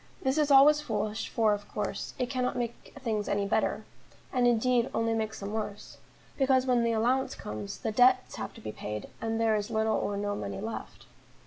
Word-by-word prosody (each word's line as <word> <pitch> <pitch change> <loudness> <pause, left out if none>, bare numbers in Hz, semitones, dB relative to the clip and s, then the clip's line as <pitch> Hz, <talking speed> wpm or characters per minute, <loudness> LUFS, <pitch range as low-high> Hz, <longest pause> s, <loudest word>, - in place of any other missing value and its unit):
This 265 +3 +1
is 300 -1 +2
always 290 +2 +7
foolish, 215 -5 -2
for, 220 -2 +3
of 205 0 -5
course, 200 -1 -4
it 250 -2 -1
cannot 250 -1 -1
make 235 -1 -5
things 220 -5 -2
any 200 0 +1
better, 200 - 0 0.5
and 250 -2 +3
indeed 240 +1 +2
only 225 0 +1
makes 220 -1 -2
them 200 +1 -5
worse; 210 -2 -5 0.4
because 265 -1 +3
when 245 -2 +3
the 230 - +2
allowance 245 +4 +1
comes, 105 -1 -6
the 220 - -3
debts 255 +3 +4
have - - -4
to - - -12
be 110 - -5
paid, 105 0 -6
and 225 0 -1
there 225 -1 +3
is 210 +1 -2
little 220 -1 +1
or 205 - -2
no 205 0 -1
money - - -5
left. 225 +3 -6
225 Hz, 200 wpm, -29 LUFS, 210-255 Hz, 0.5 s, always